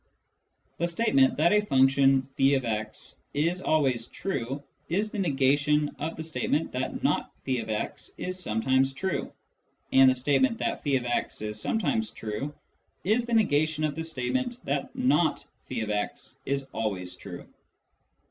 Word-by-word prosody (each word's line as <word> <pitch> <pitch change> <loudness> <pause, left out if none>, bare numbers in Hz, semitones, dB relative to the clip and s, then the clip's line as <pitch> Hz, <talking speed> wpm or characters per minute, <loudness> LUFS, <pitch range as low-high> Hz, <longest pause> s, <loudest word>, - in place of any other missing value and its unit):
The 170 - +1
statement 170 - +3
that 165 +4 +4
a 210 - +5
function 135 -5 +4
<f>x 120 -6 0 0.2
is 170 +5 +1
always 130 -9 +1
true 140 -6 -4 0.3
is 205 +5 0
the 210 - -4
negation 145 -2 +2
of 160 +2 -3
the 160 - -5
statement 160 0 -1
that 130 +1 -3
not - - +1
^x 110 -5 -2
is 185 0 -4
sometimes 130 -1 +1
true, 155 0 -2 0.6
and 135 0 +8
the 130 - +3
state 135 +2 +2
ment 225 +13 +3
that - - -2
<j>x 125 -6 -1
is 105 0 -4
sometimes 225 0 0
true 110 +7 -4 0.5
is 225 +5 +2
the 240 - -2
negation 155 -7 +2
of 155 -1 +1
the 160 +2 -4
state 135 -7 -2
ment 250 -2 -1
that 260 +1 -2
not 255 -11 +2 0.2
^x 105 -4 -3
is 140 0 0
always 95 -5 -2
true. - - -9
140 Hz, 140 wpm, -28 LUFS, 130-170 Hz, 0.6 s, and